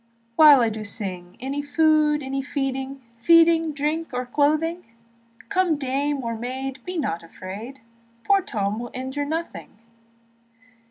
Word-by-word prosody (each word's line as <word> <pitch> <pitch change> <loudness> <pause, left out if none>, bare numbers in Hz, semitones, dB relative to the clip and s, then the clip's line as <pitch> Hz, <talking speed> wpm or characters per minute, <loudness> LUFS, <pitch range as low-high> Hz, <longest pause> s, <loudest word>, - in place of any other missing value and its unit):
Although 295 -4 +9
I 220 -1 -1
sing, 190 -4 -4
Any 275 +3 -3
food, 300 0 +2
any 270 +1 -2
feeding, 270 -1 -4
Feeding, 330 +4 +5
drink, 300 +3 -2
or 250 0 -2
clothing; 310 +6 +1 0.7
Come 370 -5 +2
dame 280 +1 -1
or 230 -1 -3
maid, 260 +3 -5
be 365 0 -5
not 170 - -2
afraid, 200 +10 -9 0.4
Poor 395 -1 +3
Tom 210 - -2
will 240 0 -6
injure 265 +3 -3
nothing. 320 -6 -5
275 Hz, 125 wpm, -23 LUFS, 245-310 Hz, 0.7 s, Although